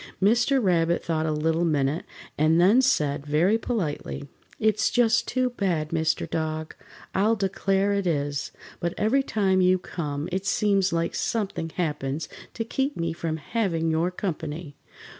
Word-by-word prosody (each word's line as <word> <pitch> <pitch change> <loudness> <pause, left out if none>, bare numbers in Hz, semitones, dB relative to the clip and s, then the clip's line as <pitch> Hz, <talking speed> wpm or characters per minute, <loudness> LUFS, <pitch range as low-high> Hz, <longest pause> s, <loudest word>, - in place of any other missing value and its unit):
Mr. 235 +7 +3
Rabbit 170 -5 +2
thought 160 -1 -1
a - - +1
little 160 +2 +1
minute 150 -1 0 0.3
and 155 +2 +3
then 200 +9 +6
said, 150 - +1
very 165 +9 +2
politely: 170 - -3 0.3
"It's 215 -1 +2
just 240 -1 +3
too 255 -1 0
bad, 175 -9 -1
Mr. 160 0 0
Dog, 155 -1 -3 0.4
I'll 215 +4 +3
declare 195 0 +1
it 200 -2 0
is. 145 -3 -1 0.3
But 170 0 -2
every 225 +6 +3
time 195 -7 +1
you 185 0 +4
come 150 -4 -4
it 190 +2 -2
seems 195 -3 +2
like 165 0 0
something 195 -7 -2
happens 150 -3 -2 0.3
to 225 - -2
keep 270 +5 -1
me 165 -1 -1
from 160 -1 -3
having 165 -2 -1
your 165 +3 +1
company. 160 -4 -5
175 Hz, 150 wpm, -25 LUFS, 155-205 Hz, 0.4 s, then